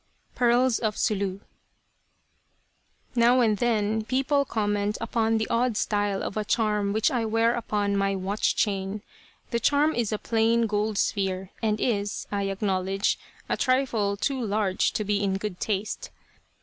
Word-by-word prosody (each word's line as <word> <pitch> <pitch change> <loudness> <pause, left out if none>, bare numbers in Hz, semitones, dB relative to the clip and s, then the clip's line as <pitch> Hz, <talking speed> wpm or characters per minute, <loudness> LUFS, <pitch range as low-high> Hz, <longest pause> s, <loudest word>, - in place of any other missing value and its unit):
PEARLS 245 0 +3
OF 215 -2 -1
SULU 200 -2 -1 1.7
Now 245 +1 +4
and 220 -4 +3
then 220 -2 +1
people 270 +5 +1
comment 205 -2 -1
upon 225 -1 +1
the 220 - -1
odd 235 -1 +1
style 205 -2 0
of - - -4
a 215 - -1
charm 210 -2 +1
which 220 +2 +2
I 245 -3 0
wear 225 +1 +2
upon 205 -4 -1
my 195 0 +1
watch 195 +2 0
chain. 200 0 -1 0.5
The 235 - +1
charm 290 +6 +3
is 235 -3 -1
a 215 - 0
plain, 230 +1 +2
gold 210 0 -1
sphere, 190 -2 -1
and 215 -2 0
is, 205 -4 -1
I 200 -1 -1
acknowledge, 195 0 0 0.3
a - - 0
trifle 240 -6 +1
too 265 +4 -1
large 205 -3 +1
to 215 - -1
be 205 0 0
in 195 -1 0
good 195 -2 -5
taste. 215 - -3
215 Hz, 150 wpm, -26 LUFS, 200-235 Hz, 1.7 s, Now